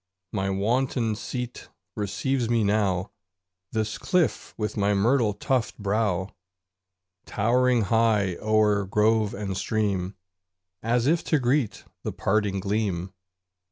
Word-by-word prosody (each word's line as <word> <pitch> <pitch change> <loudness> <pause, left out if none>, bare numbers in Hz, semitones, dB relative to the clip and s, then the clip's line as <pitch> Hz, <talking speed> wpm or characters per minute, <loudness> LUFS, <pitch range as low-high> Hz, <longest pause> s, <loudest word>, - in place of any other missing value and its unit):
My 95 -2 -1
wonted 115 +3 0
seat 125 -1 -5 0.3
receives 115 +4 -1
me 115 -2 +2
now 100 -3 +1 0.6
This 110 -1 -2
cliff 175 - 0
with 105 -1 -2
myrtle 105 +2 +2
tufted 125 +2 -1
brow, 100 -2 -1 0.9
Towering 120 +2 +2
high 105 -3 +2
o'er 105 -2 +2
grove 105 +1 +2
and 100 -1 -4
stream, 100 -2 -1 0.7
As 120 +1 +1
if 160 +4 +2
to 155 - +2
greet 125 -2 0 0.2
the - - -3
parting 100 -1 0
gleam. 100 -2 -2
110 Hz, 110 wpm, -26 LUFS, 100-120 Hz, 0.9 s, me